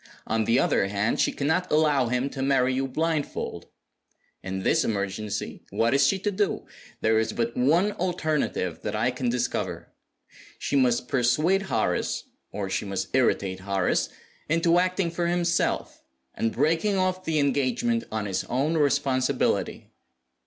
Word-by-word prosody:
On 110 0 0
the 115 +3 +3
other 115 -7 +2
hand, 100 +3 0
she - - +3
cannot 160 +6 -1
allow 150 -4 +3
him 125 +3 0
to 135 - -5
marry 135 -1 +2
you 135 +1 -1
blindfold. 155 +2 -2 0.7
In 95 0 -4
this - - +3
emergency 100 0 -3
what 115 +2 +1
is 140 - +4
she 195 - +2
to 205 +2 -1
do? 205 +1 -1 0.4
There 110 0 +3
is 110 - -1
but 115 0 -2
one 165 +11 +3
alternative 155 - -1
that 105 0 -3
I 115 +4 +1
can 125 0 -2
discover. 125 +1 -2 0.6
She - - -2
must 125 -2 +2
persuade 150 +11 +2
Horace 100 -6 0 0.3
(or 100 -1 -3
she 95 - -2
must 95 -2 -3
irritate 100 -7 +1
Horace) 95 -1 0 0.4
into 165 +2 +3
acting 185 -1 0
for 170 0 -1
himself, 170 0 0 0.3
and 115 - -1
breaking 165 - +1
off 185 0 0
the 160 -3 -1
engagement 130 -5 +1
on 110 -1 -2
his 95 -2 -2
own 145 +6 0
responsibility." 140 -3 0
130 Hz, 150 wpm, -26 LUFS, 110-165 Hz, 0.7 s, is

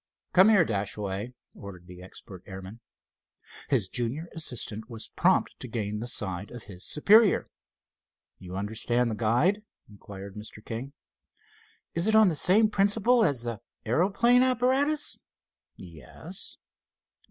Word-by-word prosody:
"Come 185 +4 +7
here, 200 -6 +5
Dashaway," 100 +1 -3 0.2
ordered 90 -3 -11
the 90 0 -12
expert 95 0 -11
airman. 95 +3 -9 0.9
His 120 -9 +2
junior 125 - -3
assistant 115 -8 -3
was 115 -2 -8
prompt - - +2
to - - -7
gain 105 -3 -4
the 120 - -5
side 95 -5 -2
of 120 -2 -10
his 95 -3 -10
superior. 205 +7 +4 0.9
"You 90 0 -9
understand 115 +4 -1
the - - -3
guide?" 125 - +1 0.3
inquired 100 -1 -11
Mr. 105 +1 -10
King. 125 +5 -6 1.0
"It - - -2
is 220 - +3
on 220 -3 +6
the 165 - -2
same 205 +8 +5
principle 220 +4 +3
as 140 - +1
the 115 -3 -5 0.3
aeroplane 200 - +3
apparatus?" 260 +4 +2 0.6
"Yes." 90 - -7
120 Hz, 130 wpm, -27 LUFS, -, 1.0 s, Come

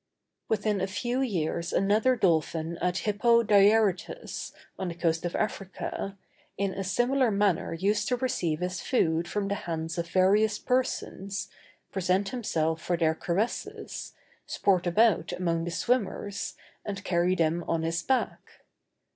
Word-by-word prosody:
Within 210 -2 +1
a 190 - 0
few 240 +6 -2
years 170 -7 -1
another 215 +6 +3
dolphin 165 -4 +1
at 180 +1 0
Hippo 235 +3 +4
Diarrhytus, 210 - +2 0.3
on 190 - -2
the 170 - -4
coast 165 -1 0
of 175 - -2
Africa, 195 -1 -3 0.4
in 195 -1 0
a 195 - -3
similar 245 +6 +2
manner 200 -5 +1
used 205 +4 +1
to 250 - +2
receive 180 -11 -1
his 180 +1 -2
food 170 -9 +1
from 200 +2 -2
the 200 - 0
hands 165 -3 -4
of 170 - -2
various 205 +4 +3
persons, 200 -6 -2 0.4
present 190 +1 +1
himself 165 -9 -1
for 175 - 0
their 160 -2 +2
caresses, 185 +8 -3 0.3
sport 185 -3 +1
about 180 -2 +3
among 170 -2 -1
the - - -2
swimmers, 205 0 -1 0.3
and 200 -2 -5
carry 180 0 +2
them 165 0 +1
on 165 -1 0
his 165 0 -1
back. 265 +6 -2
190 Hz, 140 wpm, -28 LUFS, 170-215 Hz, 0.4 s, Hippo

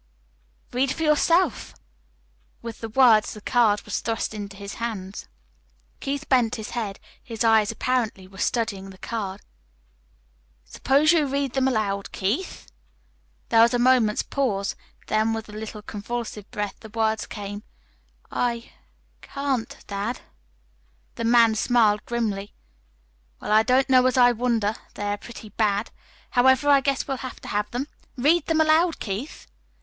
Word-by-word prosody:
"Read 260 +2 +1
for 325 - -3
yourself." 315 - +2 0.9
With 230 -2 -7
the 225 - -5
words 220 -3 +4
the - - -8
card 215 -3 +2
was 210 - -3
thrust 225 -1 -2
into 200 -2 -7
his 200 0 -7
hand. 205 -4 -5 0.7
Keith 280 +1 -4
bent 245 -4 +3
his 220 - -7
head. 215 -5 -4 0.2
His 230 -1 -4
eyes 220 -1 +4
apparently 225 -5 -1
were 190 0 -14
studying 210 -4 -1
the 190 - -12
card. 200 -2 -5 1.2
"Suppose 280 - +3
you 310 -4 +3
read 275 -1 -1
them 265 -1 +2
aloud, 205 -5 -1
Keith." 215 - -2 0.8
There 225 -1 +5
was 235 +2 +5
a - - +3
moment's 240 -3 +3
pause; 205 -8 -1 0.3
then 220 +1 +1
with 225 0 -4
a - - -9
little 215 0 -7
convulsive 215 0 -6
breath 205 -1 -4
the 220 - -11
words 220 0 0
came. 205 0 -6 0.7
"I 235 -1 -2 0.5
can't 275 -4 -3
dad." 205 +4 -4 0.9
The 230 - -4
man 230 -1 +5
smiled 220 -2 +2
grimly. 210 -4 -2 0.8
"Well, - - -5
I 215 +1 +6
don't 255 +3 +3
know 255 -1 +5
as 255 - 0
I 245 -1 +7
wonder. 230 -3 0 0.2
They 205 - -5
are - - -3
pretty 225 -1 -10
bad. 210 0 0 0.4
However, 260 +3 +4
I 280 -1 +6
guess 275 0 -1
we'll 270 - -2
have 255 -1 -7
to - - -9
have 210 0 -1
them. 250 +4 -3 0.3
Read 300 +6 +3
them 325 -1 +2
aloud, 315 +2 +3
Keith." 215 +8 -5
230 Hz, 150 wpm, -24 LUFS, 210-260 Hz, 1.2 s, I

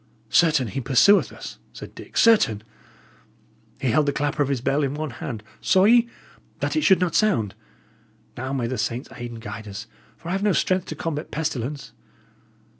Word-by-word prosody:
"Certain, 155 -6 +4
he 135 - -3
pursueth 135 - +4
us," - - -9
said - - -10
Dick - - -10
"certain! 130 - +4 1.2
He 130 - 0
held 150 +2 +2
the - - +3
clapper 145 +2 -1
of 140 - +1
his 135 -3 0
bell 135 +4 0
in 140 0 -1
one 155 -2 -4
hand, 115 -2 -6 0.2
saw 185 0 +4
ye? 235 +3 +5 0.5
that - - -1
it 310 - +2
should 190 -9 +5
not 180 -3 0
sound. 150 - +2 0.8
Now 130 +2 -4
may 135 -3 -1
the 125 +2 -3
saints 120 +4 -3
aid 120 0 -6
and 115 -1 -9
guide 105 0 -8
us, 100 -1 -7 0.3
for 170 - -9
I - - -1
have 195 +1 -1
no 205 -1 +2
strength 185 +2 +1
to - - -5
combat 160 -2 -4
pestilence!" 145 -3 -4
145 Hz, 190 wpm, -23 LUFS, 120-180 Hz, 1.2 s, ye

